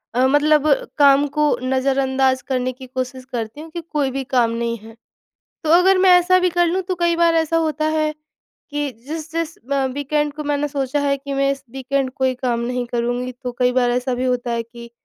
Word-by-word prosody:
अ, 255 +1 +3
मतलब 300 +2 +3 0.3
काम 285 -1 +5
को 300 +1 +1
नज़रअंदाज 265 0 +1
करने 255 -1 -2
की 255 0 -12
कोशिश 255 0 -5
करती 230 +4 -4
हूँ 325 - -10
कि 340 +1 -5
कोई 295 -5 -2
भी 270 +1 -3
काम 245 -3 +1
नहीं 235 0 -2
है। 220 +1 -14 0.7
तो 310 - 0
अगर 380 +1 +4
मैं 375 0 +5
ऐसा 370 +1 +3
भी 365 0 +2
कर 350 0 +2
लूँ, 365 +3 0
तो 370 0 -3
कई 340 -1 +2
बार 335 0 +3
ऐसा 325 0 +1
होता 310 -1 0
है 310 -1 +1 0.6
कि 290 -1 -2 0.2
जिस-जिस 325 +1 -4
म 275 -1 +1
वीकेंड 295 +1 -1
को 300 0 -6
मैंने 290 0 0
सोचा 275 0 -1
है 280 -1 +1
कि 280 +1 -7
मैं 275 0 +2
इस 275 -1 -8
वीकेंड 270 +1 -2
कोई 260 -1 +1
काम 245 -2 -1
नहीं 245 +1 -2
करुँगी, 245 +1 -2
तो 250 0 -6
कई 250 -1 +3
बार 250 -1 +2
ऐसा 250 +1 -1
भी 250 +1 -2
होता 250 -1 -1
है 235 0 -1
कि 235 +1 -12
275 Hz, 210 wpm, -20 LUFS, 250-305 Hz, 0.7 s, काम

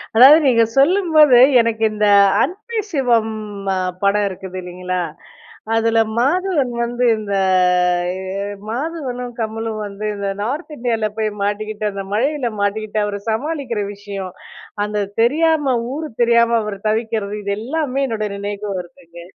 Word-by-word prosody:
அதாவது 265 +6 +9
நீங்க 235 -4 +4
சொல்லும்போது 310 -4 +5 0.2
எனக்கு 225 -1 -1
இந்த 210 0 +1 0.4
அன்பே 435 +5 -4
சிவம் 235 -7 +1 0.4
அ - - 0 0.3
படம் 205 +1 +3
இருக்குது 185 0 -8
இல்லிங்களா? 180 0 -4 0.7
அதுல 225 0 +2 0.2
மாதவன் 295 0 +1
வந்து 240 +1 -1
இந்த 210 -2 -4 0.9
எ - - -6 0.5
மாதவனும் 250 -2 -4
கமலும் 225 0 -3
வந்து 200 +1 -8
இந்த 200 -1 -3
நார்த் 290 +9 -4
இண்டியால 230 -3 -1
போய் 215 -1 0
மாட்டிக்கிட்டு, 215 +1 -3
அந்த 195 0 -5
மழயில 260 +3 0
மாட்டிக்கிட்டு 215 +1 -1
அவர 205 -1 -3
சமாளிக்குற 250 -2 -2
விஷயம், 200 -2 -7 0.5
அந்த 210 -1 -2 0.2
தெரியாம 295 +1 +2 0.2
ஊரு 310 +1 -5
தெரியாம 235 0 +4
அவர் 210 -2 -5
தவிக்குறது. 220 -2 -2
இது 200 0 -1
எல்லாமே 275 +2 -1
என்னுடைய 215 -3 -2
நினைவுக்கு 205 +1 -5
வருதுங்க. 175 -1 -11
225 Hz, 125 wpm, -19 LUFS, 205-270 Hz, 0.9 s, அதாவது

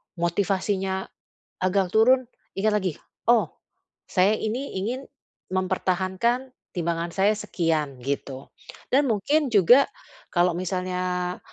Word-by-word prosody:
motivasinya 190 +2 0 0.6
agak 185 0 +2
turun, 255 +3 +5 0.3
ingat 215 +1 +2
lagi, 190 -4 0 0.4
"Oh, 235 - +4 0.6
saya 195 +3 +4
ini 240 +7 -3
ingin 240 +8 -3 0.5
mempertahankan 185 +7 0 0.2
timbangan 170 -1 -2
saya 200 +2 +4
sekian," 165 -8 -1
gitu. 135 0 -4 0.4
Dan 275 +2 +4
mungkin 275 +7 +1
juga, 230 +7 +6 0.4
kalau 175 -1 +2
misalnya, 180 0 -2
190 Hz, 100 wpm, -25 LUFS, 180-220 Hz, 0.6 s, juga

